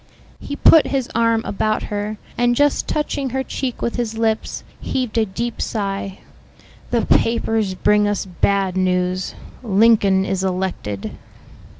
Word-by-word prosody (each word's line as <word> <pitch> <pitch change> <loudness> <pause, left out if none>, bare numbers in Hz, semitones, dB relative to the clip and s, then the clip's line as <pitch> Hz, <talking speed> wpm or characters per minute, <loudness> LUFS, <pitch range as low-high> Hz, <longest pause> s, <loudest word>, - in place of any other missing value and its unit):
He 285 - -6
put 320 +1 +6
his 270 -3 -1
arm 230 0 +2
about 215 +2 -1
her, 205 +1 -3 0.2
and 240 0 +2
just 290 +2 +2
touching 285 -3 -1
her 265 +2 -2
cheek 260 -2 -4
with 235 - -1
his 225 -2 -2
lips, 225 -1 -1 0.2
heaved 250 -4 -3
a 220 - +1
deep 235 +5 -4
sigh. 195 -2 -3 0.7
"The 235 -2 +1
papers 225 -4 +1
bring 210 +2 +3
us 205 -1 -1
bad 190 +1 0
news. 185 0 0 0.3
Lincoln 205 -3 +4
is 190 0 -1
elected." 180 - -3
215 Hz, 135 wpm, -20 LUFS, 190-235 Hz, 0.7 s, put